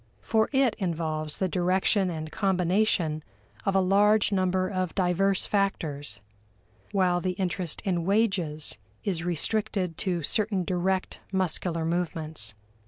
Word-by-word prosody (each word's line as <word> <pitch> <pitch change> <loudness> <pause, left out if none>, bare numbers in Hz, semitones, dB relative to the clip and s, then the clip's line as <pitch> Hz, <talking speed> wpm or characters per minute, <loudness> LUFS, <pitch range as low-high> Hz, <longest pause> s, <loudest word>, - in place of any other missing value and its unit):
For 220 -1 +2
it 265 -4 +3
involves 155 -4 -2
the 190 - +1
direction 185 +2 +2
and 155 -2 -5
combination 180 -4 +1 0.4
of 195 - +2
a - - +6
large 205 +3 +4
number 185 -1 +1
of 185 -3 -2
diverse 190 +1 +2
factors, 145 - -1 0.7
while 180 -3 +2
the 185 0 -1
interest 180 -3 -2
in 175 -3 0
wages 180 - +1 0.2
is 175 -4 -1
restricted 180 0 -1
to 175 -4 -1
certain 200 +3 0
direct 185 +1 -1
muscular 175 -3 0
movements. 160 -9 -1
185 Hz, 120 wpm, -27 LUFS, 165-195 Hz, 0.7 s, a